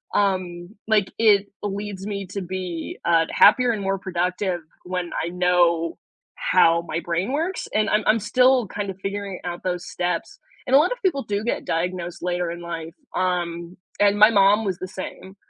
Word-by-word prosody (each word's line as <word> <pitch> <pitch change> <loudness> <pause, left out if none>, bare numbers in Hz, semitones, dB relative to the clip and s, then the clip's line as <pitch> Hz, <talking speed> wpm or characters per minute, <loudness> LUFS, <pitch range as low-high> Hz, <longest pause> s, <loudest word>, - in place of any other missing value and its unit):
Um, 185 -3 0 0.2
like, 210 -3 +2
it 205 -3 +4
leads 205 -1 -5
me 200 -1 -4
to 200 - -4
be, 180 -2 -5
uh, 165 -1 +4
happier 250 -2 +6
and 210 -3 -3
more 195 0 -1
productive 180 0 -1 0.2
when 180 -1 -4
I 170 - -2
know 175 -2 +2 0.4
how 170 - +3
my 165 - -2
brain 175 +6 -2
works 335 +6 -2
and 215 0 +2
I'm 210 0 +2
I'm 220 +1 +4
still 250 +3 +3
kind 200 +1 -4
of 190 - -6
figuring 195 -1 -4
out 175 0 -4
those 180 -1 -2
steps. 175 -1 -3 0.3
And 260 - +4
a - - +9
lot 325 +8 +2
of - - -3
people 295 -8 +1
do 205 -1 -2
get 235 - -2
diagnosed 175 +1 -2
later 175 -1 -1
in 170 0 -7
life. 165 -1 -6 0.2
Um, 175 -1 -2 0.2
and 205 0 +4
my 215 +1 +9
mom 205 +1 +4
was 190 -3 -1
the 185 - -5
same, 190 +1 -8
190 Hz, 180 wpm, -23 LUFS, 175-210 Hz, 0.4 s, a